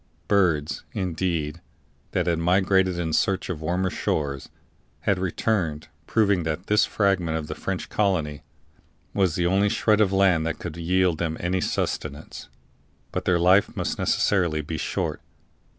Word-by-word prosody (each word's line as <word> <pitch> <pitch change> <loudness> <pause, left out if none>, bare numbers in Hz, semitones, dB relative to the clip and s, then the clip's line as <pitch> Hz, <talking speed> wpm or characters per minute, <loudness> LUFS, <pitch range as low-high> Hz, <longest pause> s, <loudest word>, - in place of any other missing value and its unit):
Birds, 85 -8 +1
indeed, 85 -3 -2 0.5
that 90 - 0
had 85 -2 +1
migrated 95 +1 +2
in 80 -2 -2
search 95 +3 +1
of 80 -3 -6
warmer 90 +3 0
shores, 70 -3 -2 0.5
had 100 0 +1
returned, 90 -4 -1 0.2
proving 100 -5 +2
that 80 +3 -3
this 105 0 +3
fragment 90 -6 +1
of 80 - -4
the - - -5
French - - -4
colony 85 -8 0 0.7
was 95 -5 +1
the 85 - 0
only 95 +3 +3
shred 110 +1 +2
of 100 -3 +3
land 95 -4 +3
that 80 - -2
could 85 -3 -6
yield 90 0 +1
them 80 -2 -2
any 90 +1 0
sustenance; 75 0 -3 0.6
but - - -3
their 90 - +3
life 90 +4 +3
must - - -2
necessarily 85 -6 +1
be 80 +3 -5
short. - - -2
90 Hz, 150 wpm, -25 LUFS, 80-95 Hz, 0.7 s, this